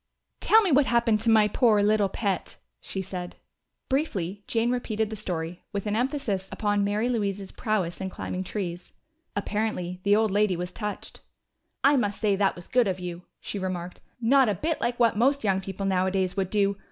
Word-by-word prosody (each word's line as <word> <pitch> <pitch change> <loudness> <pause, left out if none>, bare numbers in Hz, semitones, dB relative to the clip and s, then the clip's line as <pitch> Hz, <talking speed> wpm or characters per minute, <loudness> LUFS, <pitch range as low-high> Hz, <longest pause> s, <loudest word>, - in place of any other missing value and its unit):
"Tell 445 0 +5
me 375 - +1
what 280 -1 +4
happened 235 -3 +2
to 230 - +1
my 215 -2 +6
poor 210 -1 +3
little 210 -1 +3
pet," 200 -2 -2 0.2
she 190 - -5
said. 180 -1 -6 0.5
Briefly 205 - -1
Jane 230 +1 +1
repeated 220 -3 -1
the - - -3
story, 175 -3 -4
with 200 0 -3
an 210 0 0
emphasis 240 -6 -1
upon 205 -2 0
Mary 205 +3 0
Louise's 200 -5 -2
prowess 195 -6 -2
in 190 - -2
climbing 185 0 -4
trees. 180 -3 -5 0.4
Apparently 205 -3 -2
the 200 +2 +4
old 220 -1 +2
lady 205 -2 +2
was 180 +1 -4
touched. 210 +1 -6 0.6
"I 280 +1 +5
must 205 -5 -1
say 205 -3 +2
that 195 0 +1
was 175 - -11
good 245 -3 +3
of 185 -1 -1
you," 175 -1 -6 0.2
she 205 - -5
remarked. 180 -1 -4 0.2
"Not 250 +1 +4
a 205 - +1
bit 315 - -2
like 240 0 -1
what 230 -3 +3
most 275 +5 +3
young 190 -2 +1
people 195 +1 -5
nowadays 190 -1 +1
would 190 -2 -1
do! 200 -1 +1
205 Hz, 190 wpm, -26 LUFS, 190-225 Hz, 0.6 s, my